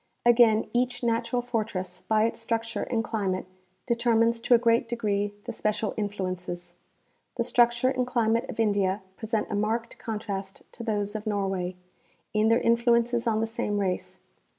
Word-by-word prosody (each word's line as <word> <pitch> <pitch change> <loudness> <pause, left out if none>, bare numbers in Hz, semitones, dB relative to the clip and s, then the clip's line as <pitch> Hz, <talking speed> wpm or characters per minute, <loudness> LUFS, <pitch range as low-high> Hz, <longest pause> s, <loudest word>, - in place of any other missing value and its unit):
Again 230 -2 +5
each 245 0 0
natural 235 +1 0
fortress 205 -7 -3
by 215 -1 +3
its 230 - -2
structure 230 0 -2
and 230 -2 -1
climate 195 -5 -2 0.4
deter 235 -1 +2
mines 230 +1 +3
to 240 +1 +4
a - - +7
great 230 0 +2
degree 205 -3 0
the 240 - -5
special 215 -1 -1
influences. 185 -4 -4 0.6
The 235 - +2
structure 240 +1 +3
and 255 -1 0
climate 230 -2 +1
of 230 - -7
India 200 -3 +1
present 220 0 -2
a - - 0
marked 225 +3 -1
contrast 200 -3 -5
to - - -10
those 205 -2 -1
of 215 0 -4
Nor 200 -2 0
way, 185 -1 -2 0.6
in 215 0 +3
their 230 +2 +4
influences 235 0 +2
on 220 -1 +2
the - - +2
same 220 -2 -2
race. 190 -3 -2
225 Hz, 165 wpm, -27 LUFS, 205-235 Hz, 0.6 s, a